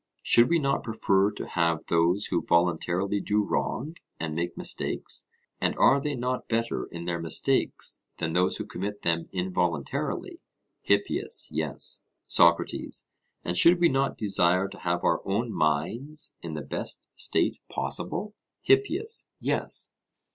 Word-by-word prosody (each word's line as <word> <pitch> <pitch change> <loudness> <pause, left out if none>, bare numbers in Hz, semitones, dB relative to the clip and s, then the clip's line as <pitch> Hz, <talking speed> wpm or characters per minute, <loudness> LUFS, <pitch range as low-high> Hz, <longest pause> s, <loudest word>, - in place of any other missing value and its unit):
Should 120 +1 +5
we 170 - +4
not 140 -3 0
prefer 100 -3 +2
to - - -6
have 85 -2 0
those 85 +4 +2
who - - 0
voluntarily 85 +3 +1
do 105 +2 +1
wrong 145 +9 -2 0.2
and 80 -1 -3
make 85 +2 -3
mistakes, - - -1 0.3
and - - 0
are 140 - +5
they 145 0 -2
not 125 +1 -2
better 115 0 -1
in 85 0 -8
their 85 -1 -2
mistakes 80 - 0 0.2
than 80 0 -2
those 90 +1 +2
who - - -4
commit 105 +2 -5
them 85 -1 0
involuntarily? 90 -5 -2 0.4
HIPPIAS: 100 0 +1
Yes. - - 0 0.2
SOCRATES: 85 0 +2 0.3
And 90 - -2
should 170 - +6
we 170 -1 +5
not 135 +1 0
desire 95 -2 +3
to - - -12
have 85 0 -1
our - - +2
own 110 +4 -1
minds 115 - -1
in 80 -2 -6
the 75 - -4
best - - -3
state - - +2
possible? 210 0 -3 0.3
HIPPIAS: 405 +2 +2
Yes. - - 0
95 Hz, 140 wpm, -27 LUFS, 85-125 Hz, 0.4 s, should